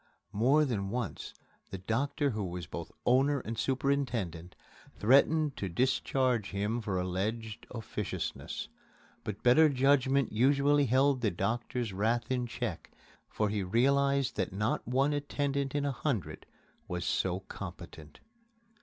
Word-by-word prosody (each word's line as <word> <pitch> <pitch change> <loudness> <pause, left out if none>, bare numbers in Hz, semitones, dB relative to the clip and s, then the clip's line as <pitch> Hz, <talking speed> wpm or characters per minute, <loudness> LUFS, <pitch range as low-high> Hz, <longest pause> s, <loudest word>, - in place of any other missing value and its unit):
More 135 +9 +4
than 100 -7 -2
once 120 0 -4 0.4
the 95 - -5
doctor 135 +9 0
who 105 -2 -3
was 90 -2 -5
both - - -7
owner 135 +3 +3
and 115 0 -5
superintendent 120 - -1 0.4
threatened 140 +5 +4
to 95 - -3
discharge 125 +1 +1
him 105 +4 -1
for 100 -4 -2
alleged 105 +5 -3
officiousness. 115 -3 -4 0.6
But 105 -1 -6
better 155 +6 +6
judgment 135 -1 +3
usually 140 +4 +3
held 130 +2 +3
the 110 - +2
doctor's 110 +4 -2
wrath 110 +5 0
in 125 -1 0
check, - - -4 0.4
for 105 -1 0
he 105 0 -1
realized 140 +6 +2
that - - -1
not 105 +9 -1
one 135 +4 +2
attendant 140 -1 -1
in 145 -1 0
a 140 - +1
hundred 110 - -3 0.4
was 90 -1 -3
so 95 0 0
competent. 85 -5 -10
120 Hz, 130 wpm, -31 LUFS, 100-140 Hz, 0.6 s, better